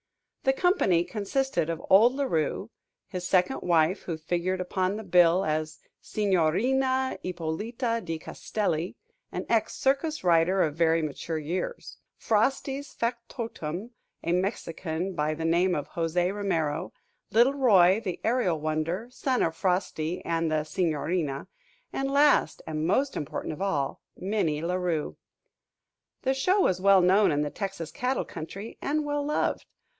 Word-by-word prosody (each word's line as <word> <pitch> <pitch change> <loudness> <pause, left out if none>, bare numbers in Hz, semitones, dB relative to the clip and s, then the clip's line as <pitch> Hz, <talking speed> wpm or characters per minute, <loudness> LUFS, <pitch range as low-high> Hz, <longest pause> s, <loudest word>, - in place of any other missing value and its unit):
The 265 - +3
company 270 - +3
consisted 210 - -1
of 165 0 -4
old 220 +7 +6
La 280 - 0
Rue; 185 - -1 0.4
his 180 -1 -4
second 185 +8 +2
wife, 170 +1 +2
who 165 -3 -4
figured 175 +3 -1
upon 185 +1 -1
the 220 - -6
bill 180 0 +4
as 155 0 -2 0.2
Signorina 245 +8 +1
Ippolita 215 +8 -2
di 165 -2 -3
Castelli, 175 0 -3 0.4
an - - -4
ex 225 -2 +1
circus 280 - 0
rider 175 +2 +4
of 155 - 0
very 165 0 +3
mature 155 +2 -3
years; 175 - -4 0.2
Frosty's 270 +5 0
factotum, 230 -5 -4 0.3
a 170 - -1
Mexican 180 -2 -2
by 155 -2 -1
the 165 +1 -4
name 175 +2 +3
of 145 - -4
José 175 +2 0
Romero; 180 -5 -1 0.4
little 240 +5 +4
Roy, 205 -7 +5
the 185 -4 -3
Aerial 225 -9 +1
Wonder, 155 +7 -2
son 255 0 0
of 165 -1 0
Frosty 180 -2 -1
and 165 -1 0
the 155 -1 +1
Signorina; 155 -3 -1 0.5
and 270 0 -1
last 280 - +3
and 155 0 -2
most 270 +9 +1
important 150 - -4
of 155 - -9
all, 170 -9 -1 0.2
Minnie 180 -6 -1
La 175 +2 -1
Rue. 175 -4 -1 1.1
The 265 - +2
show 365 +9 +2
was 185 - +2
well 195 -1 +6
known 190 +3 +4
in 145 0 +1
the 145 - -3
Texas 190 -5 -5
cattle 260 -1 -1
country, 195 +7 -8
and 300 +1 0
well 290 0 -1
loved. 300 +1 -1
185 Hz, 145 wpm, -27 LUFS, 165-230 Hz, 1.1 s, old